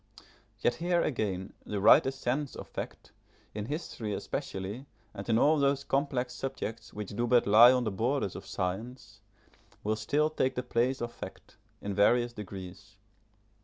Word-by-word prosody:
Yet - - +3
here 175 0 +2
again, 100 -8 -2
the 105 - -3
writer's 130 +6 +6
sense 135 +2 -2
of - - -8
fact, - - -7 0.4
in 105 0 -4
history 120 - -4
especially, 100 +8 -5 0.3
and 100 +3 -7
in 110 - +4
all 150 +5 +4
those 140 0 +2
complex 135 -3 -1
subjects 115 -6 -5
which 105 -2 -6
do 120 +4 -1
but 120 0 +4
lie 115 +4 +9
on 125 -1 +2
the 110 - -1
borders 115 +1 -1
of - - -8
science, 100 +2 -4 0.6
will 110 +1 +1
still 145 +8 +1
take 130 -4 0
the 125 - -2
place 125 +3 0
of 120 0 -3
fact, - - -10 0.3
in 100 - -2
various 120 +4 +3
degrees. 100 -1 -9
120 Hz, 160 wpm, -30 LUFS, 105-135 Hz, 0.6 s, lie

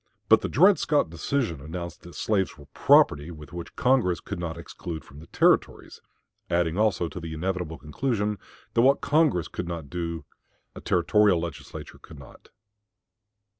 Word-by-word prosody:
But - - +7
the - - -3
Dred 190 +6 +5
Scott 150 - +1
decision 85 - -2
announced 85 +3 -7
that 85 - -13
slaves 100 -3 0
were 75 - -14
property 75 +3 +4
which 85 +1 -9
Congress 125 -9 +2
could 100 - -6
not 85 -1 -4
exclude 85 -1 -7
from 70 - -14
the 80 - -13
Territories, - - +1 0.5
adding 85 -1 +1
also 105 -4 +1
the 80 -1 -7
inevitable 90 -1 -3
conclusion 105 - -2 0.3
that 115 - +3
what 135 +3 +4
Congress 150 - +2
could 90 - -5
not 85 -5 -6
do 85 -3 -4 0.5
a - - -10
Territorial 95 +1 +3
Legislature 80 -3 -8
could 80 - -14
not. 70 -2 -15
85 Hz, 150 wpm, -26 LUFS, 80-105 Hz, 0.5 s, But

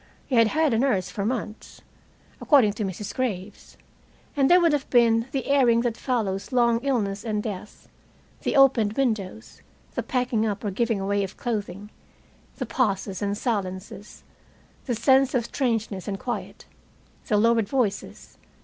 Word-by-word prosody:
He - - -7
had 230 -1 +5
had 310 +3 +1
a 225 - +2
nurse 195 -9 0
for 200 +2 -3
months, 220 -3 -5 0.6
according 255 -9 +4
to 215 - -4
Mrs. 200 +1 -5
Graves. 205 -6 -4 0.6
And 275 -2 +3
there 360 - +7
would 335 -3 +3
have 285 -2 -2
been 230 -1 +3
the 270 - -2
airing 250 -5 +3
that 240 -2 -1
follows 220 -6 -2
long 235 -2 +3
illness 215 -8 -1
and 210 -3 -2
death, 210 -2 -7 0.5
the - - -1
opened 255 -6 +4
windows, 220 -4 -3 0.3
the - - -2
packing 250 -4 -1
up 210 -1 -2
or 205 - -2
giving 225 +1 0
away 200 +1 0
of 195 - -7
clothing, 205 -3 -4 0.6
the - - -4
pauses 195 -6 -1
and 205 0 -1
silences, 200 -3 -4 0.6
the 245 - 0
sense 265 +3 +3
of 240 -2 +1
strangeness 225 -8 -2
and 195 -1 -3
quiet, 245 -2 -5 0.6
the 210 - +2
lowered 225 -1 +2
voices. 240 -7 -3
225 Hz, 155 wpm, -25 LUFS, 205-250 Hz, 0.6 s, there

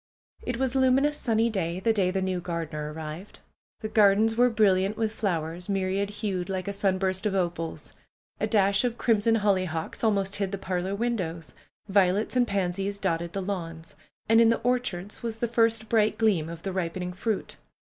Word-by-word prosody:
It 245 - -3
was 260 -1 0
a 265 - +1
luminous 270 +3 +3
sunny 225 -4 +1
day, 175 -3 -2
the 225 +4 +2
day 195 -4 +2
the 190 0 -1
new 185 -1 -1
gar 170 -1 -3
dener 150 -1 -5
arrived. 160 +5 -8 0.4
The 215 - -3
gardens 215 +1 +4
were 245 +2 +4
brilliant 205 -2 +2
with 220 -1 0
flowers, 175 -3 -3
myriad 195 0 0
hued, 200 -4 -3
like 190 -1 -3
a 200 - -2
sunburst 190 0 0
of 195 - -1
opals. 170 -3 -3 0.5
A - - 0
dash 200 -1 +3
of 240 -1 -1
crim 225 -4 +2
son 225 +2 +3
hollyhocks 185 -6 -1
almost 200 -3 +1
hid 195 -2 -2
the 200 - -3
parlor 185 0 -2
windows. 185 -9 -3 0.3
Vio 190 -2 +4
lets 210 +5 -2
and 245 -1 +3
pansies 195 0 -1
dotted 170 -3 -2
the 195 - -3
lawns. 165 -4 -5 0.3
And 225 +1 +6
in 230 - +6
the 230 - +1
orchards 220 -6 -2
was 230 -1 -4
the 235 - -1
first 225 -1 +2
bright 215 -1 +2
gleam 190 -8 +2
of 165 0 -8
the 195 - -3
ripening 180 0 -3
fruit. 205 +3 -3
195 Hz, 190 wpm, -27 LUFS, 180-220 Hz, 0.5 s, And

